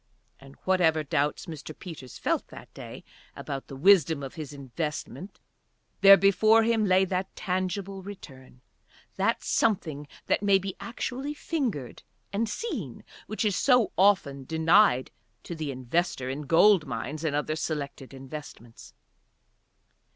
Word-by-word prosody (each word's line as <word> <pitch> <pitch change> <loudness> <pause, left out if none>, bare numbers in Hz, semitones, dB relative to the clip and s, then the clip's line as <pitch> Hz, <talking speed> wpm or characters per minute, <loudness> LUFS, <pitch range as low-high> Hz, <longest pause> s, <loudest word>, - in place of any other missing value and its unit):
And, 135 0 -15
whatever 165 -4 +3
doubts 145 +1 -1
Mr. 155 -2 -8
Peters 145 -9 -9
felt - - -1
that - - -13
day - - -10 0.3
about 135 -1 -6
the 135 - -9
wisdom 160 -2 +4
of 135 - -6
his 155 -4 -7
investment, 145 - -6 0.6
there 195 0 +9
before 215 +3 +4
him 225 -1 +2
lay 190 0 +4
that 185 0 -3
tangible 185 +1 -3
return, 135 -10 -12 0.6
that - - +1
something 155 -9 0 0.2
that - - +1
may 200 -1 +4
be 195 0 -5
actually 260 +4 -4
fingered 245 - -3 0.3
and 220 +2 0
seen, 210 - -5 0.2
which 215 +1 -2
is 205 -3 +1
so 250 -5 +3
often 180 -9 +2
denied 160 -1 +3 0.3
to - - -6
the 155 -3 -4
investor 130 +1 -2
in 145 +1 -6
gold 165 +1 +5
mines 145 +7 -5
and 155 -3 0
other 150 +1 -1
Selected 145 -4 -4
Investments. 135 -4 -11
165 Hz, 135 wpm, -27 LUFS, 140-200 Hz, 0.6 s, there